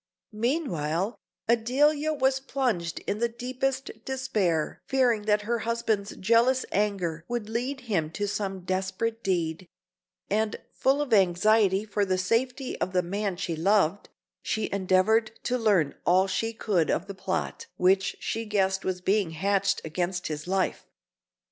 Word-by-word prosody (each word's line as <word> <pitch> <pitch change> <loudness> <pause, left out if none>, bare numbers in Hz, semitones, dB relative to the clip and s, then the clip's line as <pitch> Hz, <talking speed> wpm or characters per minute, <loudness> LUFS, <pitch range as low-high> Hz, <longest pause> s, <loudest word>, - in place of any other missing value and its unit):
Meanwhile, 210 - -1 0.3
Adelia 285 +7 +3
was 265 -2 +2
plunged 250 -11 -2
in 205 - -2
the 235 0 +1
deepest 255 +3 -2
despair, 210 -12 -1
fearing 250 -5 +2
that 210 0 +3
her 235 +2 -1
husband's 225 -3 -1
jealous 235 +5 +3
anger 185 -6 -1
would 240 -3 -3
lead 250 +5 -3
him 190 -11 -1
to 205 +2 -2
some 195 -2 -3
desperate 190 +5 -2
deed; 170 -2 -1 0.6
and 215 +1 0
full 275 +2 +2
of 260 -5 -3
anxiety 195 +1 +4
for 205 -1 0
the 185 -1 +1
safety 250 +7 0
of 185 - -1
the 180 -1 +2
man 195 +1 -2
she 170 -1 -2
loved, 195 +2 +2 0.3
she 220 - -2
endeavoured 200 +4 +2
to 250 - 0
learn 200 - +2
all 185 +2 +4
she 195 +4 -1
could 205 -7 0
of - - 0
the 200 - -7
plot 325 - -3
which 190 +2 +2
she 225 - -2
guessed 190 -2 +1
was 185 -1 -2
being 195 -1 +2
hatched 195 +4 +1
against 175 +3 -2
his 150 +1 -4
life. 190 0 -1
205 Hz, 145 wpm, -27 LUFS, 185-235 Hz, 0.6 s, anxiety